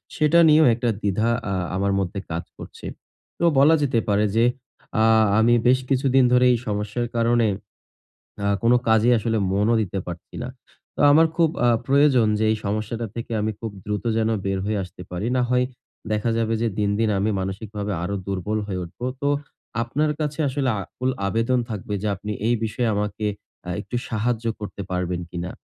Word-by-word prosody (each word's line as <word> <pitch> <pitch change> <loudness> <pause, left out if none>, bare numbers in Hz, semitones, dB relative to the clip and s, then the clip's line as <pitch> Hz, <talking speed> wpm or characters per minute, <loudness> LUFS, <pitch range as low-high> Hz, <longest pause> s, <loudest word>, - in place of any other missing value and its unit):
সেটা 155 +2 +4
নিয়েও 155 +1 +6
একটা 120 +1 -1
দ্বিধা 105 +3 0 0.2
আ - - 0 0.2
আমার 100 +1 +1
মধ্যে 95 +1 -2
কাজ 85 +1 -2
করছে। - - -11 0.5
তো 170 - +2
বলা 150 +4 +6
যেতে 130 -5 +2
পারে 105 +1 +3
যে, 115 +1 +4 0.6
আ - - +5 0.4
আমি 120 +2 +4
বেশ 130 +1 +5
কিছুদিন 135 -1 +3
ধরে 125 0 +5
এই - - +1
সমস্যার 105 +3 -2
কারণে, 115 0 +3 1.0
আ - - +1 0.2
কোন 115 - +4 0.2
কাজেই 110 +2 +4
আসলে 110 0 0
মনও 105 +4 +2
দিতে 95 -1 -4
পারছি 85 -1 -9
না। 125 - -4 0.5
তো - - -5
আমার 160 +3 +6
খুব 165 -2 +4 0.2
আ - - +5 0.2
প্রয়োজন 135 -4 +4
যে, 110 - +1
এই - - 0
সমস্যাটা 110 +3 -2
থেকে 115 0 -5
আমি 110 +1 -1
খুব 115 -2 -4
দ্রুত 105 +1 -3
যেন 110 0 +1 0.2
বের 95 0 -1
হয়ে 105 -1 0
আসতে 90 0 -12
পারি। 90 +5 -3
না 125 - +2
হয় 125 0 +3 0.5
দেখা 105 +2 0
যাবে 115 0 0
যে 115 - +2
দিন, 105 -1 +1
দিন 115 - +2
আমি 105 +3 +1
মানসিকভাবে 105 +2 -4
আরো 100 +3 -2
দুর্বল 100 +2 -2
হয়ে 95 -3 -3
উঠবো। 90 +9 -7 0.2
তো, 140 - +2 0.5
আপনার 145 +6 0
কাছে 150 0 -2
আসলে 135 0 -1
আকুল 125 +7 -3 0.2
আবেদন 115 +5 +1
থাকবে 105 0 -4
যে, - - -1
আপনি 105 +2 -5
এই 120 - +3
বিষয়ে 115 +2 -1
আমাকে 105 +1 -2 0.4
আ - - -2
একটু 120 - -5
সাহায্য 115 +1 -1 0.2
করতে 100 -1 -6
পারবেন 90 -1 -2
কিনা? 85 +1 -5
110 Hz, 185 wpm, -23 LUFS, 100-125 Hz, 1.0 s, নিয়েও